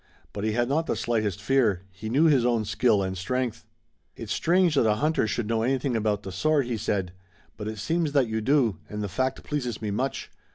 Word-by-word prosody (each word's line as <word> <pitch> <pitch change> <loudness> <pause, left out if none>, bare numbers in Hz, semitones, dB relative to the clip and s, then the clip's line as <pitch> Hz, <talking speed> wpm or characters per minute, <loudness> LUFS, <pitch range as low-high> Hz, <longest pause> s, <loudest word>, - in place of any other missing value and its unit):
But 100 - -5
he 110 0 0
had 120 +1 +1
not 160 +5 0
the - - 0
slightest 110 -5 -1
fear. 110 -5 +2
He 110 +4 -7
knew 135 +7 +3
his 140 -6 +4
own 120 -3 +1
skill 105 -2 +2
and 95 0 -3
strength. 115 +5 -2 0.5
"It's - - -4
strange 175 0 +3
that 135 -6 +3
a 105 - +3
hunter 150 -1 +1
should 115 +1 -2
know 115 0 0
anything 130 +1 0
about 105 -2 0
the 95 - -6
sword," 145 - +1
he 120 -1 -2
said, 95 -4 -1 0.4
"but 105 0 -6
it 110 0 -4
seems 160 - 0
that 135 -4 +3
you 110 0 -2
do 120 - +2
and 105 0 -4
the - - -2
fact 130 +8 -2
pleases 125 -7 -3
me 105 -2 -3
much. 130 +7 -3
115 Hz, 220 wpm, -26 LUFS, 105-135 Hz, 0.5 s, his